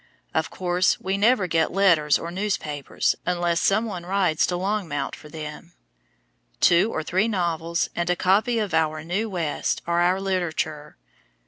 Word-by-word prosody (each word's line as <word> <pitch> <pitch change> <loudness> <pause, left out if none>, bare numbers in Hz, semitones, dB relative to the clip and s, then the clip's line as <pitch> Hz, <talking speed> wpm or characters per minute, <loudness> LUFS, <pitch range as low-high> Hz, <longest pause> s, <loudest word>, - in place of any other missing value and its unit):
Of 160 - 0
course, 180 0 +1
we 190 +1 -2
never 210 0 +3
get 165 -2 +1
letters 170 -7 +4
or 170 - -6
newspapers 175 -7 -1
unless 175 -1 0
some 215 +4 +2
one 185 -6 -5
rides 180 -3 +1
to 180 - -1
Longmount 185 -6 -2
for 150 - -14
them. 150 -1 -8 0.9
Two 175 +6 +4
or 160 - -3
three 190 +7 +1
novels 170 -4 -1
and 175 0 -1
a 180 - +3
copy 210 +7 +2
of 210 -5 -2
Our 155 -1 +1
New 195 +7 -2
West 170 -6 -2
are 170 0 +1
our 180 +2 +2
literature. 175 -6 -3
175 Hz, 155 wpm, -24 LUFS, 160-195 Hz, 0.9 s, letters